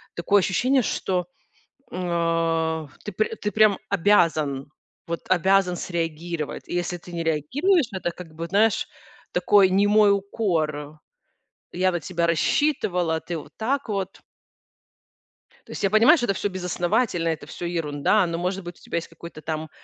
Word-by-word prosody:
такое 200 +4 +3
ощущение, 255 +8 +2
что, 180 -5 -1 0.6
м, 165 -2 0
э, - - -19 0.2
ты 210 - -5
пр 215 +3 -1
ты 210 - -1
прям 215 -3 +4
обязан, 160 -8 +2 0.4
вот 170 - -3
обязан 185 0 +3
среагировать. 165 -2 -4
И - - -4
если 175 0 -1
ты 175 +1 -13
не 170 -1 -3
реагируешь, 265 - +2
это 185 -2 -2
как 165 -3 -11
бы, 165 +1 -5
знаешь, 210 +4 +2 0.5
такой 190 +2 +4
немой 205 +1 +4
укор: 155 -7 -2 0.7
"Я 185 +1 +2
на 175 - -2
тебя 170 +2 -1
рассчитывала, 180 - +1
а - - -4
ты 170 0 -5
вот - - -10
так 260 +2 -1
вот". 195 -2 -3 1.5
То - - -11
есть - - -6
я 195 - +3
понимаю, 230 +10 +6
что 240 - 0
это 195 - +1
всё 205 - -1
безосновательно, 180 0 0
это 160 -1 -3
всё 175 - -6
ерунда, 170 +3 +1
но, 165 0 -3
может 180 +1 -2
быть, 175 0 -8
у - - -22
тебя - - -4
есть 165 - -7
какой-то 170 -2 -11
там, 155 -1 -4
175 Hz, 160 wpm, -24 LUFS, 165-200 Hz, 1.5 s, понимаю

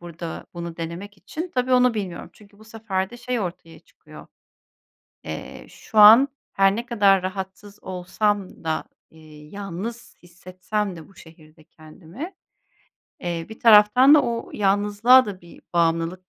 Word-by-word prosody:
burada 170 -1 -8
bunu 170 -1 -7
denemek 175 +5 -7
için 335 - -7
tabii 255 0 0
onu 250 -2 +4
bilmiyorum 190 -5 -6
çünkü 205 -1 -21
bu 220 - -17
sefer 215 -4 -4
de 240 - -11
şey 245 -1 -3
ortaya 170 -3 -7
çıkıyor. - - -16 1.0
Eee, - - -8
şu 220 - -10
an 225 +6 +9 0.3
her 195 0 +3
ne 235 +2 -4
kadar 200 -5 +3
rahatsız 190 +2 -7
olsam 190 +2 -3
da, 160 -1 -2 0.3
eee, 155 -1 -16
yalnız 205 +5 -8
hissetsem 185 +3 -5
de 160 - -12
bu 195 - -22
şehirde 160 -1 -18
kendimi, 165 - -11 0.9
eee, 170 -2 -4
bir 220 - -12
taraftan 230 +5 +6
da 300 - +5
o 235 -1 -4
yalnızlığa 205 +5 +4
da 195 -3 -7
bir 170 -1 -17
bağımlılık 170 +2 -1
195 Hz, 145 wpm, -22 LUFS, 170-220 Hz, 1.0 s, an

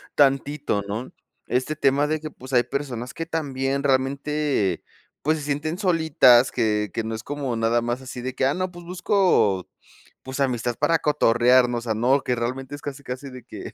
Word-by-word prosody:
tantito, 140 -4 +2
¿no?, 110 +5 -4 0.4
este 130 +5 -1
tema 145 0 +2
de 155 +1 -1
que 155 0 -7
pues 130 +1 -12
hay 120 -1 +5
personas 130 -3 -4
que 165 - -5
también 140 -4 -2
realmente, 135 - 0 0.4
pues 155 +2 +1
se 150 - -6
sienten 150 +3 -2
solitas 160 - +4
que 105 -3 0
que 115 - -2
no 110 +1 -4
es 110 - -4
como 140 -4 -3
nada 115 +1 +1
más 120 +2 -2
así 125 -1 -7
de 130 +1 -4
que: 130 - 0
"Ah, 140 - 0
no, 185 0 -2
pues 175 -1 -11
busco 175 - +2 0.5
pues 130 +1 -7
amistad 120 -3 0
para 165 -1 +2
cotorrearnos," 125 -3 +3
o - - -3
sea, 110 - +1
no, 130 +5 +3
que 125 -1 -1
realmente 130 +4 -4
es 145 - -11
casi 140 -1 -6
casi 135 +1 -7
de 125 0 -9
que: - - -9
135 Hz, 190 wpm, -24 LUFS, 120-150 Hz, 0.5 s, hay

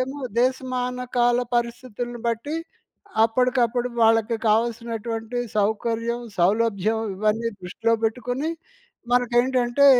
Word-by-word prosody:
అవేమో 265 +3 -3 0.2
దేశమానకాల 250 -1 0 0.2
పరిస్థితులను 240 0 -3
బట్టి 235 +7 -2 0.7
అప్పటికప్పుడు 245 0 +1
వాళ్ళకి 225 0 +4
కావాల్సినటువంటి 230 +1 -1 0.2
సౌకర్యం, 230 +3 0 0.2
సౌలభ్యం 215 +3 +2 0.2
ఇవన్నీ 215 +3 +1
దృష్టిలో 225 +6 0
పెట్టుకొని 250 +6 -1 0.6
మనకేంటంటే 245 +2 +3
235 Hz, 80 wpm, -24 LUFS, 225-250 Hz, 0.7 s, వాళ్ళకి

